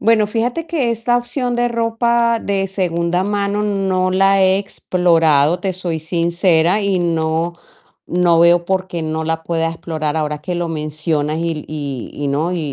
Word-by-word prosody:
Bueno, 215 -1 +3
fíjate 240 +8 -1
que 275 -8 0
esta 230 +2 0
opción 245 0 -2
de 240 0 +2
ropa 235 0 +1
de 195 -2 -1
segunda 175 -1 -1
mano 205 0 -1
no 190 -2 0
la 195 +1 +3
he 190 0 +4
explorado, 165 -5 +2
te 190 -2 -2
soy 175 -3 -3
sincera, 170 +3 +1
y 200 -3 0
no 165 0 0 0.5
no 175 -1 +2
veo 170 +1 +5
por 185 +1 -1
qué 175 -3 -5
no 160 0 -2
la 160 0 -2
pueda 165 -1 -1
explorar, 160 -2 -3
ahora 150 -1 -1
que 180 +4 -5
lo 175 -1 -2
mencionas, 155 -1 -2
y 165 -2 -3
y 140 -5 -5
y 145 -1 -3
no, 155 +6 0
y 180 - -2
175 Hz, 170 wpm, -18 LUFS, 160-200 Hz, 0.5 s, veo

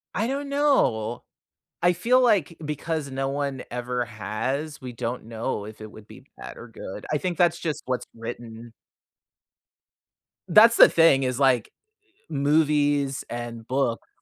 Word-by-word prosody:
I 220 +4 0
don't 280 +2 -3
know. 120 - +1 0.6
I 175 - +5
feel 245 +9 +3
like, 200 - +2
because 150 0 -3
no 135 0 -2
one 140 -1 -3
ever 125 0 -3
has, 130 +8 -4
we 125 -3 -8
don't 115 +1 -4
know 115 -2 -4
if 110 0 -11
it 110 - -9
would 110 -1 -14
be - - -14
bad - - -9
or 120 - -10
good. 105 -2 -9
I 150 - +2
think 175 +3 -3
that's 170 -1 +3
just 155 -3 -3
what's 130 -1 -2
written. 115 0 -8 1.8
That's 225 +6 +7
the - - +9
thing 165 -5 +4
is, 130 0 -1
like, 130 -5 +2 0.6
movies 145 -2 +1
and 120 -1 -6
books, 130 -3 -1
135 Hz, 150 wpm, -25 LUFS, 120-160 Hz, 1.8 s, the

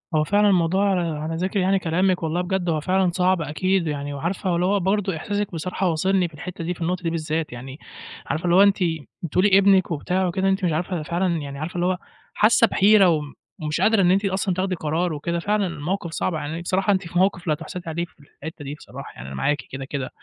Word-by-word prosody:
هو 155 - +3
فعلًا 205 +5 +3
الموضوع 190 +2 +2 0.3
على 160 +1 -3
ذِكْر 185 +4 -1
يعني 190 +1 +2
كلامِك 180 +1 +1
والله 160 +2 0
بجد 180 -1 -1
هو 160 -2 +1
فعلًا 185 +3 +1
صعب 180 0 +2
أكيد، 170 +4 0
يعني 145 -1 -3
وعارفة 175 +7 -2
هو 175 - +2
اللي 175 +1 +1
هو 200 +2 +2
برضه 195 -1 0
إحساسِك 205 +4 -2
بصراحة 180 +3 -2
واصلني 185 +3 +1
في 160 - -17
الحتّة 170 +3 -7
دي 175 +2 -2
في 170 - -14
النقطة 180 +2 -1
دي 165 - 0
بالذات، 160 -2 -2
يعني 130 +4 -9 0.5
عارفة 160 +3 -2
اللي 175 0 +3
هو 195 - +8
أنتِ 200 -1 +4 0.5
بتقولي 190 +4 +3
ابنِك 195 -2 +4
وبتاع 180 +4 0
وكده 190 +2 0
أنتِ 190 +1 0
مش 170 - +1
عارفة 175 +4 -2
ده 155 - -4
فعلًا 170 +1 0
يعني 140 -2 -6
عارفة 160 +4 -5
اللي 175 0 0
هو 185 0 +1 0.4
حاسّة 230 +2 +5
بِحِيرة 200 -2 +5
وم 150 -3 -1 0.3
ومش 150 0 -2
قادرة 220 -2 +4
إن 180 0 +4
أنتِ 195 +2 +2
أصلًا 190 0 0
تاخدي 185 +1 -1
قرار 165 +2 -1
وكده، 170 +3 -2
فعلًا 205 +1 0
الموقِف 170 +2 -3
صعب 175 - -1
يعني، 160 +2 -4
بصراحة 190 +3 +1
أنتِ 190 -2 -2
في 175 +1 -1
موقِف 185 -2 +1
لا 155 - +3
تُحسدي 165 +3 -6
عليه 170 +2 -2
في - - -27
الحتّة 145 +2 -10
دي 145 - -5
بصراحة، - - -10
يعني 65 - -9
أنا 70 - -7
معاكِ 145 - +1
كده، 135 0 -5
كده. 135 -1 -4
175 Hz, 230 wpm, -23 LUFS, 160-190 Hz, 0.5 s, هو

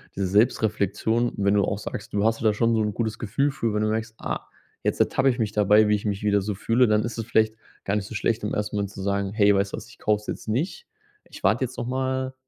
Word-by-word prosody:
diese 95 -1 -1
Selbstreflexion, 110 +2 +1
wenn 100 0 +2
du 100 - +3
auch 100 - -2
sagst, 105 +2 -7
du 100 0 +1
hast 115 +1 +1
da 110 -1 +4
schon 115 +2 +2
so 110 - +2
'n 105 -1 -1
gutes 110 -1 -2
Gefühl 125 +7 0
für, 115 -5 -2
wenn 105 - 0
du 110 - +1
merkst: 110 +1 -3
„Ah, - - -4 0.4
jetzt - - 0
ertappe 135 +1 +3
ich 120 - 0
mich 110 -2 0
dabei, 105 +1 +4
wie 105 - +4
ich 105 - -5
mich 100 -1 -2
wieder 100 -1 +3
so 100 +1 -3
fühle“, 115 +5 +2
dann 105 0 +2
ist 115 0 -4
es 115 - -3
vielleicht 110 -2 +2 0.3
gar 100 - -1
nicht 100 - -3
so 110 - -8
schlecht, 110 +2 0
im 105 - -2
ersten 105 0 -2
Moment 100 -1 -1
zu 100 - -8
sagen: 100 0 -1
„Hey, 105 -2 +4
weißt 100 0 0
du - - -2
was? - - -10
Ich - - -16
kauf's 105 0 0
jetzt - - -5
nicht. 160 - -2 0.4
Ich - - -12
warte 110 +7 +3
jetzt 130 +1 -10
noch 120 - -3
mal“, 130 0 -1
105 Hz, 270 wpm, -25 LUFS, 100-115 Hz, 0.4 s, da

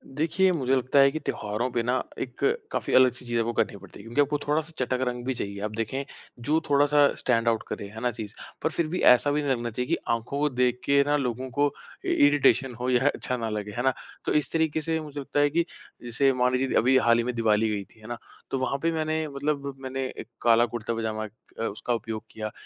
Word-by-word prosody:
देखिए, 170 +5 +2
मुझे 135 -6 +1
लगता 130 +2 +2
है 140 0 +7
कि 155 - -3
त्योहारों 105 -2 -2
पे 120 -1 0
ना 125 +2 0 0.2
एक 125 -2 -6 0.3
काफ़ी - - -2
अलग-सी 130 -1 +4
चीज़ 120 -1 -1
आपको 115 +1 0
करनी 100 - 0
पड़ती 100 -1 -14
है, - - -11
क्योंकि 115 +6 +1
आपको 145 +1 +1
थोड़ा-सा 155 +2 0
चटक 130 0 0
रंग 120 0 -3
भी 130 - 0
चाहिए। 100 -4 -5
आप 105 - -2
देखें, 130 +5 -2 0.4
जो 150 +7 +1
थोड़ा-सा 145 0 +5
स्टैंड 115 -2 +1
आउट 115 -1 +2
करे, 100 - -5
है 110 +2 -9
ना 125 - +1
चीज़। 110 -2 -7 0.3
पर - - +2
फिर 165 0 +3
भी 180 +4 -3
ऐसा 145 +4 +1
भी 150 +1 +1
नहीं 140 - 0
लगना 120 -2 -1
चाहिए 125 +3 -3
कि - - +2 0.2
आँखों 115 +5 -3
को 150 0 +2
देख 125 -1 +1
के 140 0 +4
ना 145 - +3
लोगों 130 -1 -3
को 145 +3 +1 0.3
इ - - +1
इरिटेशन 135 -3 +3
हो 125 +1 -1
या 125 +2 +3
अच्छा 125 -3 -1
ना 115 -2 -3
लगे, 105 -1 -4
है 120 - -3
ना। 130 0 +3 0.3
तो - - 0
इस 150 - +1
तरीक़े 160 -1 +1
से 160 +1 -1
मुझे 150 -2 -7
लगता 140 +1 -2
है, 145 0 +4
कि 170 +3 +1 0.4
जैसे 120 +3 +2
मान 125 0 +2
लीजिए 130 +1 +1
द - - -2
अभी 130 +2 +4
हाल 115 -2 +4
ही 120 - +1
में 125 +1 -2
दीवाली 110 -1 +2
गई 105 -2 -2
थी, 110 - -22
है 110 - -12
ना, 120 0 -4 0.3
तो - - 0
वहाँ 130 +1 0
पे 165 - +2
मैंने 155 -1 -1
मतलब 140 -1 -2
मैंने 135 0 -3
एक - - -7
काला 115 0 +5
कुर्ता-पजामा 110 -1 -2 0.3
अ, - - -1
उसका 115 +3 -2
उपयोग 110 -1 -4
किया 110 -1 -5
125 Hz, 245 wpm, -26 LUFS, 115-145 Hz, 0.4 s, है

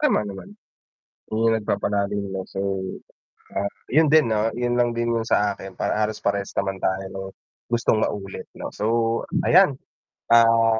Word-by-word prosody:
Tama 295 - +3
naman, 105 - -8 0.8
'yung 115 +1 +3
nagpapalim 100 -1 -1
ng 95 -1 -4
so, 95 - -5 1.0
ah, 100 - 0 0.2
'yun 155 +3 +5
din 150 -5 +4
'no, 110 +1 +1
'yun 120 0 0
lang 120 -1 +2
din 120 0 -1
'yung 115 -1 0
sa 105 -2 +2
akin 95 -1 -8
para 105 - -1
halos 105 0 -1
parehas 100 0 -1
naman 95 -1 -1
tayo 95 +1 -1
ng 95 0 -6 0.4
gustong 115 -2 +1
maulit 100 -2 -3
'no. - - -6
So 105 - -3 0.6
ayan, 185 -4 +5 0.6
ah, 115 -1 +5
110 Hz, 155 wpm, -23 LUFS, 100-120 Hz, 1.0 s, yun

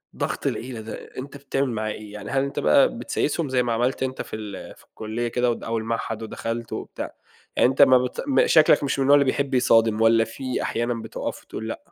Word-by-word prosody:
ضغط - - -2
العيلة 120 -2 -4
ده، 110 - -7 0.2
أنت 140 +2 -7
بتعمل 140 -1 -1
معاه 110 -2 -2
إيه؟ 105 -1 -9
يعني 105 -1 -7
هل 135 0 +2
أنت 140 - -3
بقى 75 - +4
بتسايسهم 150 -1 -1
زي 125 -1 +2
ما 120 -1 -1
عملت 125 +4 0
أنت 130 0 -3
في - - -7
ال 105 -3 -8
في - - -20
الكُلّية 110 +2 -4
كده 125 +1 0
أو 120 - +3
الد - - -9
أو 115 0 -2
المعهد، 115 0 -3
ودخلت 115 +1 -5
وبتاع، - - -6 0.4
يعني - - +4
أنت 135 +2 +1
ما 130 -2 +8
بت 125 0 -2
م 270 - +3
شكلك 155 -2 +5
مش 140 0 -1
من - - +3
النوع 140 +2 +6
اللي 140 - +4
بيحب 135 +1 -1
يصادم، 115 -3 +3
والَّا 115 0 +5
في 130 +3 -4
أحيانًا 120 +1 -1
بتقف 110 - -5
وتقول - - -7
لأ؟ - - -4
120 Hz, 225 wpm, -24 LUFS, 115-135 Hz, 0.4 s, ما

